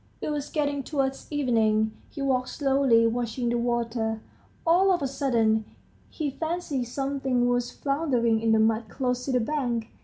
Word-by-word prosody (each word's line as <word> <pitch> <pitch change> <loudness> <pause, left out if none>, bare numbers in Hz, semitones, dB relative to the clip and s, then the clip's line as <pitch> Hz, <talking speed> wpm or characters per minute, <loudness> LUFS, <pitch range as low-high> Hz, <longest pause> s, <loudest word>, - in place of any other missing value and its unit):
It - - -3
was 295 -1 -3
getting 285 -2 -1
towards 270 -2 -2
evening. 220 -6 +2 0.2
He 280 - -6
walked 255 -2 +1
slowly, 270 -5 +3
watching 240 +1 -1
the 240 - +1
water. 230 -2 -1 0.5
All 365 +4 +4
of 350 -5 +1
a - - +1
sudden 230 -5 +1 0.5
he 300 -3 -3
fancied 320 -4 -2
something 270 -1 -1
was 245 0 +1
floundering 255 -6 0
in 225 0 +2
the 220 - +5
mud 220 0 +1
close 250 -2 -2
to 275 - -2
the 250 - +3
bank. 240 -3 -2
250 Hz, 160 wpm, -26 LUFS, 230-280 Hz, 0.5 s, the